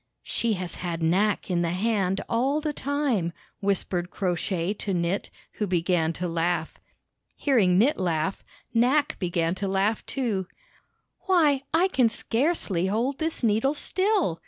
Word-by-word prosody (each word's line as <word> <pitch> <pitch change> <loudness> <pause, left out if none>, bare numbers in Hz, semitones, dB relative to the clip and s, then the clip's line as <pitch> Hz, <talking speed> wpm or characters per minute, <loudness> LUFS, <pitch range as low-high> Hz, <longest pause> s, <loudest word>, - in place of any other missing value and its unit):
"She 235 -1 0
has 185 -3 -3
had 170 -2 -3
Knack 195 +4 +1
in 175 -1 +1
the 170 - 0
hand 195 0 0
all 265 +6 +1
the 305 -1 -2
time/' 275 - -1 0.3
whispered 185 -3 -1
Crow 185 -2 -1
Shay 175 +2 -1
to 200 -2 -3
Knit, 170 +3 -1 0.2
who 210 - -3
began 175 -2 +1
to 180 +2 -3
laugh. 165 -1 -1 0.6
Hearing 210 -11 +3
Knit 245 +7 +3
laugh, 175 +1 -1 0.3
Knack 260 +6 +2
began 170 -2 0
to 195 +1 -3
laugh, 195 +3 +1
too. 215 -9 -1 0.8
"Why, 310 -8 +4
I 335 +4 +4
can 255 -11 +3
scarcely 225 - 0
hold 240 +7 -1
this 320 -4 -2
needle 230 +6 +2
still!" 375 - 0
200 Hz, 145 wpm, -26 LUFS, 175-265 Hz, 0.8 s, Why